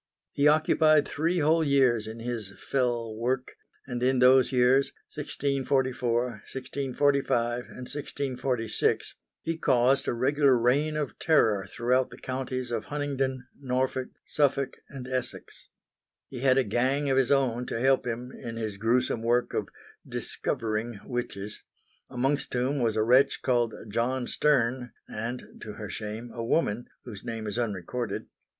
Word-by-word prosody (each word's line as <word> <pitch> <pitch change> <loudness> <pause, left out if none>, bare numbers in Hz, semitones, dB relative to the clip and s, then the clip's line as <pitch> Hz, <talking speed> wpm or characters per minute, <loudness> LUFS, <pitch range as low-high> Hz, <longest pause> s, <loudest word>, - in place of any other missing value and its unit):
He 140 - +3
occupied 155 0 +4
three 165 +4 0
whole 160 +2 +3
years 130 -6 +3
in 110 +1 -7
his 115 -5 -4
fell 120 -4 -1
work; 125 +3 -1 0.3
and 125 -2 -4
in 130 +1 +3
those 125 +1 +6
years, 130 +2 +3 0.2
1644, 130 -3 0 0.3
1645 130 -2 0
and 125 - -9
1646, 130 -5 -1 0.3
he 165 0 -2
caused 130 0 +3
a - - +1
regular 135 +2 +3
reign 145 +6 +2
of 150 -2 -3
terror 110 - +3
throughout 125 +4 +1
the - - -12
counties 130 -1 -4
of 115 -2 -2
Huntingdon, 135 -3 -2
Norfolk, 130 -1 -1 0.2
Suffolk 140 -2 +1
and 130 -3 -8
Essex. 130 -1 -5 0.6
He 130 - -7
had 130 0 +4
a 135 - +4
gang 130 +6 +1
of 135 - +2
his 135 -1 +3
own 125 -3 +2
to - - -3
help 135 +1 +3
him 120 +2 -4
in 115 -2 -7
his 110 -3 -4
gruesome 115 +2 +1
work 120 +2 +1
of - - -2 0.4
"discovering" 110 0 -2
witches; 105 -5 -4 0.5
amongst 135 +3 0
whom 130 +3 0
was 115 -2 +1
a 110 - +2
wretch 130 +4 +4
called 120 -3 +1
John 120 +4 -1
Stern 125 -4 +1
and 115 +3 -6
to 105 - -7
her 105 -1 -7
shame 110 +2 -5
a 115 - -4
woman, 115 -3 0 0.2
whose 105 -5 -8
name 115 -2 -5
is 105 +3 -2
unrecorded. 110 +1 -3
125 Hz, 145 wpm, -28 LUFS, 115-135 Hz, 0.6 s, those